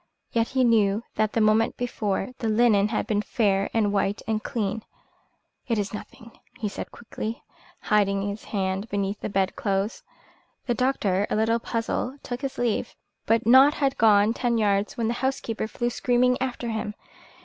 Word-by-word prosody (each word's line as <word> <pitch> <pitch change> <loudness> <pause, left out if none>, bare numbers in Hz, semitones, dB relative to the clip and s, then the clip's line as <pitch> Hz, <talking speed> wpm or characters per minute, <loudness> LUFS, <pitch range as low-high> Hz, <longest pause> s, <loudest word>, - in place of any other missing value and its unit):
Yet 230 -1 +1
he 260 -1 +1
knew 220 -3 +3
that 215 0 0
the 225 - +2
moment 215 +2 +3
before 210 -5 -2
the 225 - -1
linen 215 -2 +4
had 215 - -1
been 210 -1 0
fair 200 -3 +1
and 210 -3 +1
white 200 +1 0
and 220 -1 0
clean. 220 -4 -2 0.9
"It 230 -3 0
is 205 0 -2
nothing," 225 +2 -10 0.2
he 215 - -2
said - - -6
quickly, 230 0 -6 0.4
hiding 200 -1 +1
his 205 +1 -6
hand 195 +1 -2
beneath 200 0 -2
the - - -4
bed 195 -1 0
clothes. 200 -4 -1 0.6
The 245 - +1
doctor, 210 -7 +1
a - - 0
little 225 +2 +2
puzzled, 235 +4 -3
took 245 +1 -5
his 275 -2 -4
leave, 240 -3 -1 0.3
but 225 0 +3
had - - -25
not 270 +3 +5
gone 210 0 +5
ten 240 -1 0
yards 205 -1 +1
when 230 -2 0
the 235 - 0
housekeeper 250 -5 -2
flew 240 +2 -2
screaming 250 +1 +2
after 250 -2 -2
him. 215 -1 -3
220 Hz, 170 wpm, -25 LUFS, 205-240 Hz, 0.9 s, not